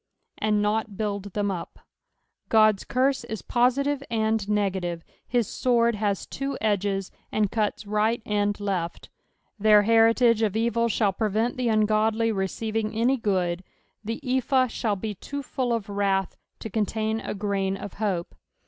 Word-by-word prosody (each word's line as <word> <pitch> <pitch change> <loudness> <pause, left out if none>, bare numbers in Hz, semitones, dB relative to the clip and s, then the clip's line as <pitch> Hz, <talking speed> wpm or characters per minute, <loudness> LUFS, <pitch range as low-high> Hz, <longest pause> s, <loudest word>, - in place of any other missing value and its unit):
" - - -52
And 210 -1 +1
not 215 0 0
baild 200 -2 -3
them 205 -1 0
up." 170 -3 -6 0.7
Ood's 215 -3 +5
curse 265 +1 +1
is 220 -3 -6
positive 275 +4 +1
and 220 -2 0
negative; 190 -5 -1 0.2
his 240 -4 +1
sword 235 -2 +2
has 205 -2 -1
two 275 +1 -4
edges, 200 -2 0 0.2
and 210 -2 +1
cuts 215 -1 -1
right 215 +3 +1
and 205 0 0
left. 185 -4 -3 0.5
Their 210 0 +6
heritsge 230 +1 +4
of 215 -1 +1
evil 235 +1 +1
shall 205 -2 +1
prevent 220 +3 0
the 250 -1 -1
ungodly 220 +1 +2
receiving 215 +2 -2
any 245 +4 +2
good; 185 -5 0 0.4
the 225 +2 -4
ephah 260 +1 +2
shall 225 -3 -1
be 210 +2 -4
too 285 +8 -6
full 260 -3 -2
of 230 -4 -1
wrath 200 -2 0 0.3
to 220 - -5
contain 220 +1 -1
a - - -5
grain 195 -1 -1
of 205 0 -8
hope. 185 -5 -1
215 Hz, 150 wpm, -25 LUFS, 200-230 Hz, 0.7 s, Their